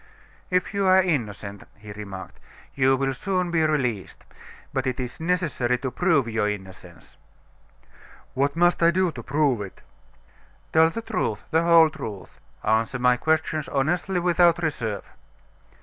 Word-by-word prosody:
"If 180 +2 0
you 200 -1 +1
are 185 0 +6
innocent," 105 - -3
he 105 -1 -12
remarked, 100 -2 -9 0.3
"you 135 0 +3
will 135 0 0
soon 180 +5 -2
be 165 -1 +2
released: 125 -11 -2 0.5
but - - -1
it 130 0 -2
is 125 -1 -5
necessary 160 -8 0
to 130 0 -4
prove 160 -8 +2
your 110 -2 0
innocence." 95 -3 -9 1.2
"What 140 +2 0
must 175 +1 +3
I 170 - +6
do 185 0 +1
to 125 - -8
prove 135 -3 +1
it?" 100 -2 -9 0.9
"Tell 160 0 +6
the 230 +6 -6
truth, 105 - -2
the 160 0 +3
whole 165 -2 +6
truth: 110 -11 -8 0.2
answer 110 +3 +1
my 125 0 +3
questions 155 +2 -1
honestly 175 +7 0
without 175 -1 +3
reserve." 115 -10 -2
140 Hz, 145 wpm, -24 LUFS, 115-170 Hz, 1.2 s, are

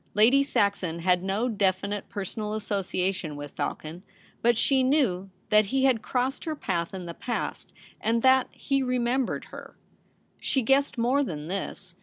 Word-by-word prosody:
Lady 235 +7 +6
Saxon 200 -10 0
had 180 0 +3
no 195 +6 0
definite 200 -2 -1
per 200 -1 -4
sonal 210 +2 -4
association 190 -5 -2
with 145 -1 -7
Falcon, 160 +3 -4 0.4
but 235 -1 +3
she 265 +2 +3
knew 255 -9 +2 0.2
that 215 0 +6
he 265 +6 0
had 255 -5 +3
crossed 260 +6 -1
her 315 -1 -2
path 170 - -2
in 185 -2 -6
the 170 - -6
past, 235 +7 -4 0.3
and 230 +1 +1
that 260 -1 +5
he 275 -1 -1
remembered 250 0 0
her. - - -10 0.6
She 265 - 0
guessed 270 +3 +2
more 250 +5 +2
than 155 - -5
this. 190 -1 -5
215 Hz, 160 wpm, -27 LUFS, 185-260 Hz, 0.6 s, Lady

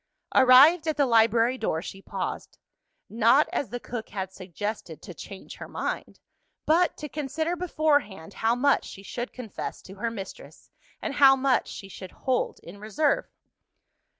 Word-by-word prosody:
Arrived 275 +6 +7
at 310 - 0
the 285 - +4
library 230 +1 +3
door, 160 - -1
she 195 +3 -8
paused. - - -5 0.5
Not 230 +6 +4
as 275 - -1
the 245 +3 -5
cook 235 -2 -6
had 190 -1 -5
suggested, 185 -2 -6
to 180 - -8
"change 190 +3 -10
her - - -8
mind;" - - -4 0.5
but 345 +3 +3
to 300 - -6
consider 305 +4 -2
beforehand 300 - 0
how 225 +1 +1
much 280 +3 +3
she 195 - -10
should 240 +5 -5
confess 235 -6 -6
to 190 - -11
her 210 +4 -3
mistress, 195 -4 -10 0.3
and 295 - -2
how 275 -2 +7
much 265 -1 +1
she 195 - -8
should 185 -1 -10
hold 260 -2 -1
in 180 +4 -11
reserve. 275 +8 0
240 Hz, 155 wpm, -26 LUFS, 200-285 Hz, 0.5 s, Arrived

